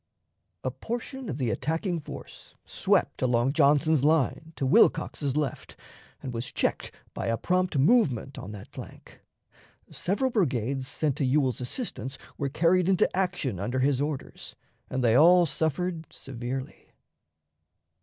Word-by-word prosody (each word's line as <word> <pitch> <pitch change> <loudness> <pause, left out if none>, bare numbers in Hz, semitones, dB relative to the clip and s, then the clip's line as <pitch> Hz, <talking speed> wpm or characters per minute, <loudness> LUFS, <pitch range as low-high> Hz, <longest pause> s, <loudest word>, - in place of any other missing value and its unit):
A 130 - -1
portion 240 - -5
of 140 - -3
the 125 -5 0
attacking 165 - -1
force 150 - -11
swept - - +1
along 125 +1 +2
Johnson's 150 -1 +4
line 160 +1 +1
to 135 - -2
Wilcox's 140 +1 +3
left, 150 -4 -3 0.5
and 130 - -5
was 120 +2 -4
checked - - -1 0.2
by - - -4
a 115 0 +1
prompt 180 0 0
movement 140 - +2
on 100 - -7
that 100 -2 -10
flank. - - -11 0.7
Several 255 +8 -1
brigades 135 - 0
sent 145 0 -1
to 145 - 0
Ewell's 130 -2 +1
assistance 135 - -4 0.2
were 140 - -2
carried 175 +5 +2
into 190 -1 +2
action 180 - -1
under 125 +6 -2
his 135 0 +2
orders, 145 -2 -5 0.3
and 130 0 -2
they 115 -2 +4
all 175 +5 +7
suffered 160 +2 -2
severely. 130 0 -7
140 Hz, 135 wpm, -27 LUFS, 130-170 Hz, 0.7 s, all